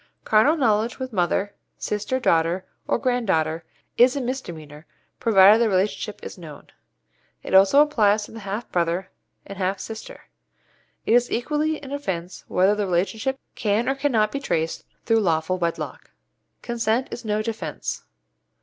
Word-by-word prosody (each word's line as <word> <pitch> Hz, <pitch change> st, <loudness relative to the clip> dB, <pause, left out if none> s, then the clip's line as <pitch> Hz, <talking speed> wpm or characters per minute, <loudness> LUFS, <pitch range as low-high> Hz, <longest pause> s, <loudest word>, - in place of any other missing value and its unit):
Carnal 245 Hz, +10 st, +4 dB
knowledge 225 Hz, -3 st, +1 dB
with 260 Hz, -2 st, -6 dB
mother, 195 Hz, +2 st, 0 dB, 0.2 s
sister, 210 Hz, +5 st, -2 dB
daughter, 170 Hz, -3 st, +1 dB, 0.2 s
or -, -, +2 dB
grand 245 Hz, -2 st, -1 dB
daughter, 160 Hz, -1 st, 0 dB, 0.4 s
is 250 Hz, +2 st, +6 dB
a -, -, -1 dB
misdemeanour, 170 Hz, -, -6 dB, 0.3 s
provided 210 Hz, 0 st, +6 dB
the 230 Hz, -, +3 dB
relationship 200 Hz, +2 st, -1 dB
is -, -, -8 dB
known. 155 Hz, -4 st, -11 dB, 0.7 s
It -, -, -6 dB
also 195 Hz, +10 st, +7 dB
applies 215 Hz, -8 st, +2 dB
to -, -, -10 dB
the 225 Hz, -, -9 dB
half 205 Hz, +3 st, -5 dB
brother 175 Hz, +2 st, -1 dB, 0.3 s
and 200 Hz, -1 st, -9 dB
half 190 Hz, +1 st, 0 dB
sister. 225 Hz, -, -8 dB, 0.8 s
It -, -, +2 dB
is 245 Hz, 0 st, +4 dB
equally 300 Hz, +5 st, -1 dB
an 270 Hz, -, -8 dB
offence 190 Hz, -11 st, -4 dB
whether 190 Hz, +3 st, +3 dB
the 210 Hz, -1 st, -1 dB
relationship 215 Hz, +9 st, -1 dB
can 215 Hz, 0 st, 0 dB
or 270 Hz, -, +2 dB
cannot 250 Hz, -7 st, +1 dB
be 280 Hz, -, -3 dB
traced 165 Hz, -, -2 dB, 0.2 s
through 225 Hz, -1 st, +3 dB
lawful 170 Hz, -1 st, 0 dB
wedlock. 170 Hz, -1 st, -4 dB, 0.5 s
Consent 235 Hz, +1 st, -1 dB
is 240 Hz, -, -6 dB
no 215 Hz, -1 st, -1 dB
defence. 215 Hz, -9 st, -4 dB
210 Hz, 150 wpm, -23 LUFS, 185-245 Hz, 0.8 s, also